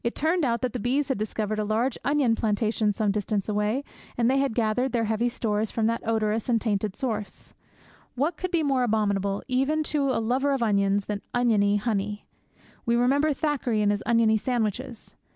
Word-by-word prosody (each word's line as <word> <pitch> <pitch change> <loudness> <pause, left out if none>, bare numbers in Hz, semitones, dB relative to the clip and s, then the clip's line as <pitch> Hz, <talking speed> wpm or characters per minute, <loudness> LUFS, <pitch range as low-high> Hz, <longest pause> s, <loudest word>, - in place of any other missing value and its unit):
It 235 - -2
turned 325 +3 +1
out 235 -3 0
that 250 - -1
the 250 - -3
bees 265 +6 0
had 265 - -1
discovered 215 0 -2
a - - +1
large 225 +4 0
onion 280 -3 +2
plantation 215 -1 0
some 205 0 0
distance 205 -1 -2
away, 210 +5 0 0.3
and 240 +1 +3
had 275 -3 +1
gathered 245 +3 0
their 235 -2 +1
heavy 225 +2 0
stores 215 -2 -1
from 225 - -1
that 230 +1 0
odorous 220 0 0
and 230 -2 +3
tainted 210 -3 -1
source! 215 -5 -4 0.6
What 295 +7 0
could 370 +3 -4
be 340 -3 +1
more 270 -3 +1
abominable, 200 -4 0
even 275 +4 +1
to 280 -2 +1
a 260 - +1
lover 260 +5 +1
of 265 -3 0
onions, 200 -2 +2
than 205 -1 -4
oniony 215 -4 +3
honey? 210 -1 -2 0.6
We 235 - +1
remember 275 +6 +3
Thackeray 265 -7 0
and 205 - +3
his 205 0 -1
oniony 230 -2 +4
sandwiches. 235 +1 -3
230 Hz, 190 wpm, -26 LUFS, 210-260 Hz, 0.6 s, oniony